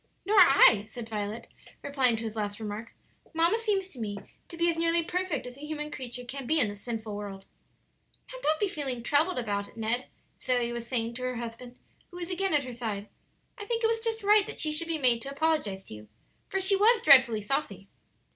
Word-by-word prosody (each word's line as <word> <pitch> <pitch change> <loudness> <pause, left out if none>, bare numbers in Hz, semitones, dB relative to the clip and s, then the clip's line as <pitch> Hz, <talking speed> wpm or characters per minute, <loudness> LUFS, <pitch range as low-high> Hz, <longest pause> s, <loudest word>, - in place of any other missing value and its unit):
"Nor 410 +1 +4
I," 270 - +7
said 235 -1 -8
Violet, 215 +1 -4 0.4
replying 265 -4 +2
to 225 - -5
his 220 -1 -5
last 205 -1 -3
remark; 215 +1 -6 0.4
"mamma 335 +7 +3
seems 405 -4 0
to 265 - -10
me 205 -3 -4 0.3
to 335 - -10
be 340 +1 +2
as 335 - +2
nearly 335 0 +2
perfect 360 -4 -2
as 250 +1 -9
a - - -14
human 300 -1 -4
creature 250 -3 -6
can 265 +1 -6
be 315 +3 +2
in 225 - +3
this 205 0 -8
sinful 220 -3 -5
world." 200 -2 -7 0.9
"Now - - -8
don't 315 +4 +1
feel 275 -8 -3
troubled 300 +7 +2
about 205 -4 -2
it, - - -20
Ned," 230 +3 -1 0.3
Zoe 245 -2 0
was 235 -1 -5
saying 235 -2 -1
to 250 - -8
her 255 0 -2
husband, 240 +1 -7 0.3
who 355 - -11
was 350 +1 -5
again 380 -2 0
at 290 - +2
her 255 - -7
side. 215 -4 -4 0.5
"I 415 - -6
think 465 +1 -2
it - - +5
was 455 0 0
just 450 -1 -3
right 415 0 +5
that - - -7
she 310 - +1
should 305 +2 +1
be 330 -1 -1
made 245 -5 +3
to 275 - -6
apologize 280 -10 0
to - - -11
you, 105 0 -11 0.4
for 385 - -1
she 385 +1 +3
was 435 +3 +4
dreadfully 250 -6 +7
saucy." 205 -4 -3
255 Hz, 220 wpm, -28 LUFS, 225-335 Hz, 0.9 s, I